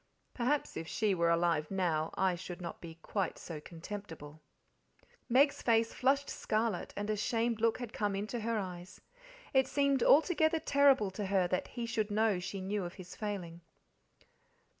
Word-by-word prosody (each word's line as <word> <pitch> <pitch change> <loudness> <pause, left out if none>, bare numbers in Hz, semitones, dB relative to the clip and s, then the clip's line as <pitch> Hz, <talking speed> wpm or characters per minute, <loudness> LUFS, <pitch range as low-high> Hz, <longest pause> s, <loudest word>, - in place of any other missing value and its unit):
"Perhaps 260 +4 -1
if 165 - -5
she 215 +1 +1
were 170 -2 +2
alive 170 -2 +2
now 170 -5 0
I 190 -1 +2
should 175 0 -7
not 170 -2 -7
be 165 -2 -9
quite 195 -5 -2
so 155 -3 -7
contemptible." 165 -3 -9 0.9
Meg's 275 +4 +4
face 230 -1 +2
flushed 275 +2 +2
scarlet, 215 -4 -1
and 205 0 -2
a - - +1
shamed 225 +2 0
look 230 -1 +3
had 245 -3 -7
come 205 -2 -1
into 215 +4 -3
her 230 +1 -1
eyes. 180 -2 -6 0.5
It 265 -1 +4
seemed 280 -2 +2
altogether 315 +3 +4
terrible 275 -9 +4
to 200 +1 -4
her 190 -2 +2
that 185 - -1
he 240 -2 -5
should 225 -2 -1
know 210 -2 +2
she 185 +2 -5
knew 200 +1 -2
of 175 0 -6
his 185 -2 -10
failing. 180 -6 -5
205 Hz, 165 wpm, -33 LUFS, 175-235 Hz, 0.9 s, Meg's